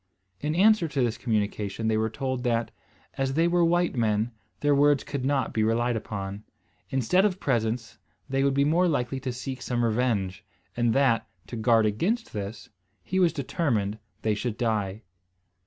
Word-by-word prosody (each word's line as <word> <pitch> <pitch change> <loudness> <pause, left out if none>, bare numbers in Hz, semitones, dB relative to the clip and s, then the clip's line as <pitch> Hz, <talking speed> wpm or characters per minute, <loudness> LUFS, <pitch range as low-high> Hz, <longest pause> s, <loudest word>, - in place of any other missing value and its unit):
In 150 +6 -2
answer 205 -1 +5
to 145 -3 -1
this 120 -2 0
communication 105 -1 -1
they 110 - +2
were 110 +1 +1
told, 130 +2 -3
that, 115 -2 0 0.5
as 135 0 0
they 165 +2 +3
were 175 0 +3
white 175 -1 +2
men, 110 -1 +1 0.3
their 145 0 +3
words 145 0 +4
could 140 -3 -4
not 135 0 0
be 110 - +1
relied 120 +2 +1
upon. 100 -2 -5 0.5
Instead 135 - +2
of 195 -3 +1
presents, 115 - -1 0.3
they 135 0 0
would 140 -1 +2
be 140 0 +3
more 170 +5 +3
likely 135 -4 -1
to 130 -1 -3
seek 130 +2 -6
some 120 -1 0
revenge; 110 -5 0 0.3
and 120 -1 +2
that, 135 -4 +3 0.2
to - - -7
guard 115 -1 +3
against 185 - -1
this, 105 0 -5 0.4
he 185 - -1
was 175 -3 +4
determined 120 - -1 0.2
they 110 - +2
should 110 +1 -3
die. 110 -3 -1
125 Hz, 170 wpm, -27 LUFS, 110-145 Hz, 0.5 s, answer